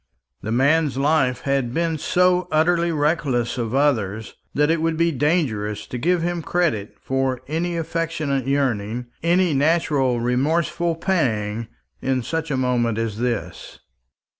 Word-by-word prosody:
The 110 - -4
man's 140 +3 +2
life 135 -3 +2
had 135 -3 -1
been 165 -2 0
so 180 +3 +2
utterly 170 +2 +2
reckless 145 -6 0
of 115 +1 -2
others, 110 -7 0 0.2
that 150 +2 +3
it 165 -1 +1
would 165 0 0
be 170 0 +2
dangerous 125 - 0
to 125 - -6
give 175 +5 +1
him 175 0 -1
credit 155 - -1
for 135 -1 -1
any 170 +3 -2
affectionate 160 -5 -2
yearning 125 -4 0 0.2
any 175 0 +2
natural 140 -4 +2
remorseful 155 +7 0
pang 115 - -1 0.3
in 130 -2 0
such 160 +4 -3
a 135 - 0
moment 120 -3 +1
as 115 -2 -2
this. 120 -3 -3
140 Hz, 140 wpm, -22 LUFS, 120-165 Hz, 0.3 s, that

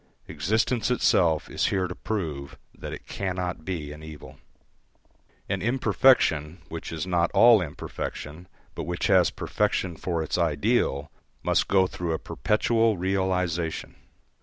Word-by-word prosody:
Existence 110 +3 0
itself 85 -10 +2
is - - 0
here 95 -2 0
to 90 - -5
prove 80 -10 -4 0.2
that - - -8
it - - -8
cannot 90 -3 -3
be 80 -4 -4
an 75 +1 -10
evil. 75 -3 -11 1.1
An 95 -1 -2
imperfection 95 - +2
which 80 0 -6
is 80 -1 -3
not 85 -1 +1
all 115 -3 +7
imperfection, 80 +1 -6 0.3
but - - -5
which 90 +1 -2
has 95 -4 +5
perfection 95 -4 -1
for 85 0 -2
its 80 - -2
ideal, 75 -2 +1 0.3
must - - +2
go 95 -1 +4
through 90 -2 -3
a - - 0
perpetual 110 +2 +1
realisation. 90 -3 -1
90 Hz, 135 wpm, -26 LUFS, 80-100 Hz, 1.1 s, all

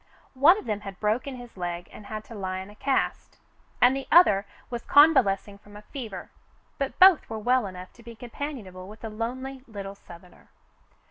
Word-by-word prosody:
One 295 +8 +6
of - - -8
them 210 -3 -2
had 195 -2 -9
broken 235 +6 -1
his 245 -1 -12
leg 175 -1 -5
and 205 - -12
had 215 0 -6
to 230 - -13
lie 190 -3 -4
in 190 +2 -8
a - - -16
cast, 265 +4 -1 0.4
and 250 +2 +5
the 270 - -5
other 205 - +6 0.2
was 240 -1 -4
convalesc 270 -11 +5
ing 200 -1 -12
from 205 0 -14
fever, 230 -9 -7 0.5
but 275 -1 -3
both 370 -3 +6
were 220 - -4
well 245 +1 +1
enough 185 -1 -10
to 235 - -18
be 235 0 -11
compan 255 +2 -6
ionable 185 0 -10
with 215 +2 -13
the 225 - -6
lonely 260 +5 -5
little 200 -3 -7
Southerner. 180 -2 -16
220 Hz, 195 wpm, -26 LUFS, 195-260 Hz, 0.5 s, One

